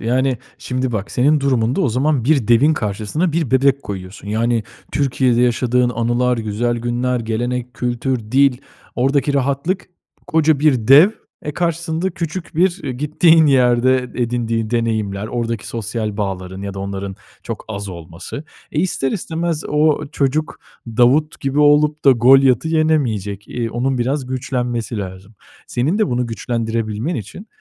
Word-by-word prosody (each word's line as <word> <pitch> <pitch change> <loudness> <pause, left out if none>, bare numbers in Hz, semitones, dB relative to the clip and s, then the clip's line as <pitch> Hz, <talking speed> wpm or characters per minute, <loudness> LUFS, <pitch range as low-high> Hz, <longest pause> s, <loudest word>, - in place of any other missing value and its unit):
Yani, 130 +3 +1 0.2
şimdi 130 -1 -2
bak, 105 -3 -3
senin 145 +4 +2
durumunda 130 -3 +1
o - - +2
zaman 130 +1 +1
bir 140 -6 +2
devin 125 +7 +5
karşısına 110 - -2
bir 160 -5 -1
bebek 135 +1 +3
koyuyorsun. 95 0 -8
Yani, 115 +1 0 0.3
Türkiye'de 130 -3 +1
yaşadığın 125 0 +2
anılar, 120 +1 0
güzel 115 +2 -1
günler, 120 +1 -1
gelenek, 120 +2 -3
kültür, 125 +1 -1
dil, 135 -1 +4 0.4
oradaki 135 +2 +1
rahatlık 140 +7 -1 0.4
koca 155 -2 +2
bir 130 -7 +2
dev, 150 +9 +8 0.3
eee, 150 - -3
karşısında 170 +2 -1
küçük 170 +1 -5
bir, 175 +2 +2
eee, 135 - -2
gittiğin 155 +4 +4
yerde 130 -2 +4 0.2
edindiği 115 -2 -1
deneyimler, 110 -4 -1
oradaki 115 -2 -3
sosyal 110 -1 -4
bağların 95 -2 -4
ya 100 -1 -5
da - - -7
onların 100 0 -5 0.3
çok - - -6
az 100 -2 -5
olması. 85 - -8 0.3
E, 150 - +1
ister 160 -7 -1
istemez 165 -3 -2
o 150 0 +2
çocuk 145 +3 -1 0.3
Davut 125 +7 +2
gibi 135 +1 -1
olup 150 +1 +3
da 140 - +8
Golyat'ı 130 +2 +5
yenemeyecek, 125 - 0
eee, 115 -2 -3
onun 125 +3 -1
biraz 130 +3 -1
güçlenmesi 125 -3 -3
lazım. 95 +2 -8 0.3
Senin 145 - 0
de 215 - +3
bunu 125 0 0
güçlendirebilmen 115 +3 -2
için, 135 - -7
125 Hz, 145 wpm, -19 LUFS, 115-145 Hz, 0.4 s, dev